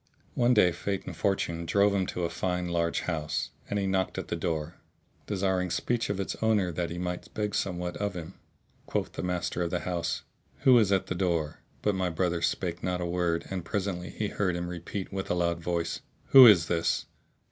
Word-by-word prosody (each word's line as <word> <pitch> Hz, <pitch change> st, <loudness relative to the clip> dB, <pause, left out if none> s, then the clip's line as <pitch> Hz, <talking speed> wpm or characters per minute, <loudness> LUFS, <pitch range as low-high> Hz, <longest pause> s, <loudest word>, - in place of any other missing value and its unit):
One 125 Hz, +1 st, +3 dB
day 90 Hz, -4 st, +5 dB
Fate 95 Hz, +3 st, -3 dB
and -, -, -6 dB
Fortune 85 Hz, -4 st, -1 dB
drove 100 Hz, +2 st, +4 dB
him 95 Hz, -2 st, +1 dB
to 90 Hz, -, -3 dB
a 85 Hz, -, 0 dB
fine 90 Hz, -1 st, -1 dB
large 85 Hz, -1 st, 0 dB
house, 80 Hz, -3 st, -2 dB, 0.2 s
and 105 Hz, -, -1 dB
he 100 Hz, -, 0 dB
knocked 95 Hz, -1 st, 0 dB
at -, -, -5 dB
the -, -, -1 dB
door, 80 Hz, -1 st, -3 dB, 0.5 s
desiring 95 Hz, -2 st, 0 dB
speech 120 Hz, +7 st, -1 dB
of 100 Hz, -1 st, -1 dB
its 95 Hz, -, -2 dB
owner 105 Hz, -5 st, +2 dB
that 85 Hz, +1 st, -2 dB
he 85 Hz, -, -5 dB
might 90 Hz, 0 st, -4 dB
beg 105 Hz, -1 st, -1 dB
somewhat 90 Hz, -2 st, -2 dB
of 100 Hz, -2 st, -2 dB
him. 85 Hz, +1 st, -6 dB, 0.5 s
Quoth -, -, -1 dB
the -, -, -5 dB
master 90 Hz, -1 st, -2 dB
of 85 Hz, -, 0 dB
the 90 Hz, 0 st, -1 dB
house, 85 Hz, -3 st, -2 dB, 0.4 s
"Who 130 Hz, -3 st, +7 dB
is 105 Hz, -3 st, +2 dB
at 95 Hz, -1 st, +2 dB
the -, -, -3 dB
door?" 85 Hz, -4 st, -1 dB, 0.2 s
But 105 Hz, -, +2 dB
my 95 Hz, -1 st, 0 dB
brother 85 Hz, 0 st, 0 dB
spake 85 Hz, 0 st, -1 dB
not 90 Hz, -1 st, -1 dB
a 90 Hz, -, -2 dB
word 85 Hz, -1 st, 0 dB
and 95 Hz, -2 st, -3 dB
presently 90 Hz, -1 st, -3 dB
he 105 Hz, -1 st, -3 dB
heard 95 Hz, -4 st, 0 dB
him 85 Hz, 0 st, -3 dB
repeat 90 Hz, +3 st, -5 dB
with 95 Hz, -1 st, -3 dB
a -, -, +1 dB
loud 85 Hz, -1 st, 0 dB
voice, 85 Hz, -1 st, -2 dB, 0.3 s
"Who 130 Hz, -2 st, +11 dB
is 90 Hz, -7 st, +7 dB
this?" 85 Hz, -1 st, 0 dB
90 Hz, 210 wpm, -29 LUFS, 85-100 Hz, 0.5 s, Who